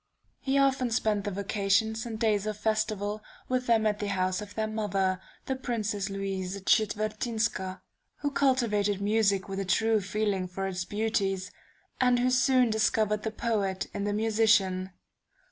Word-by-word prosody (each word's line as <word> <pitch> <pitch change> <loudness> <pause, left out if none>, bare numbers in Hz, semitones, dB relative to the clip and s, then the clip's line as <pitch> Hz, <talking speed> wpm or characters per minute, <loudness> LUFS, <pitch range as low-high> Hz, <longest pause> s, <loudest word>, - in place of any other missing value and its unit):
He 270 0 0
often 270 -2 +2
spent 215 -2 0
the - - 0
vacations 205 +3 0
and 220 -2 -5
days 215 -3 +1
of 215 -1 -3
festival 215 -1 -1 0.3
with 255 0 -1
them 225 -2 +3
at 210 -1 +1
the 205 - -2
house 185 -1 0
of 205 -1 -9
their 220 - 0
mother, 195 -4 -1 0.2
the 265 - -1
Princess 215 -6 -2
Louise 195 -1 -3
Czetwertynska, 215 -2 0 0.4
who 285 - 0
cultivated 225 -8 +1
music 200 -2 +2
with 195 0 -4
a - - -1
true 220 +3 +2
feeling 200 -1 -1
for 195 +2 -4
its 180 -2 -3
beauties, 200 -3 -1 0.5
and 250 -1 +4
who 250 +1 +2
soon 250 -1 +4
discovered 215 -1 +1
the 220 - -2
poet 210 -4 -1
in 200 - -3
the 205 - 0
musician. 210 -4 +2
210 Hz, 155 wpm, -28 LUFS, 195-225 Hz, 0.5 s, and